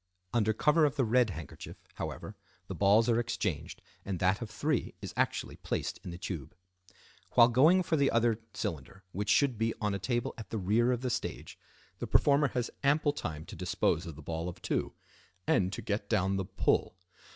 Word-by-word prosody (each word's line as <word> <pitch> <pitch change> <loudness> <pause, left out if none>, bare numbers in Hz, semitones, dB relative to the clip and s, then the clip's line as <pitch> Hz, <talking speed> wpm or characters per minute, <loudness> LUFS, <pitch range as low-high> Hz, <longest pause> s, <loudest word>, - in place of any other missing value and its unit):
Under 110 -2 +3
cover 150 +8 +3
of 145 -1 +2
the 135 -4 +2
red 120 +1 +3
handkerchief, 80 -6 -8 0.2
however, 105 - -6 0.3
the 95 - -6
balls 100 +5 +4
are 120 -1 +3
exchanged 105 - -3 0.2
and 95 -2 -3
that 95 +4 +1
of 115 - -5
three 145 +4 -1
is - - -7
actually - - -1
placed - - -3
in - - -6
the 85 - -6
tube. 85 -4 -6 0.8
While 120 -1 +7
going 155 +10 +5
for 165 -2 +1
the 140 -1 +3
other 115 -1 +2 0.2
cylinder, 80 +5 -5
which 100 +3 -3
should 130 -4 +3
be 115 0 0
on 105 -1 0
a 100 - -2
table 120 +4 -1
at 105 -4 -8
the 115 - -3
rear 110 +6 +2
of 125 -1 -1
the 130 -1 -1
stage, - - -4 0.4
the - - -3
performer 145 0 +4
has 125 -2 -2
ample 145 +1 +3
time 80 - -5
to - - -9
dispose 85 +3 0
of 80 - -7
the 80 - -11
ball 80 +3 -3
of 90 - -9
two, - - -1 0.5
and 95 -1 +2
to - - -5
get 100 0 -2
down 95 -3 +2
the 95 - -2
"pull." 95 -1 0
110 Hz, 195 wpm, -31 LUFS, 95-125 Hz, 0.8 s, While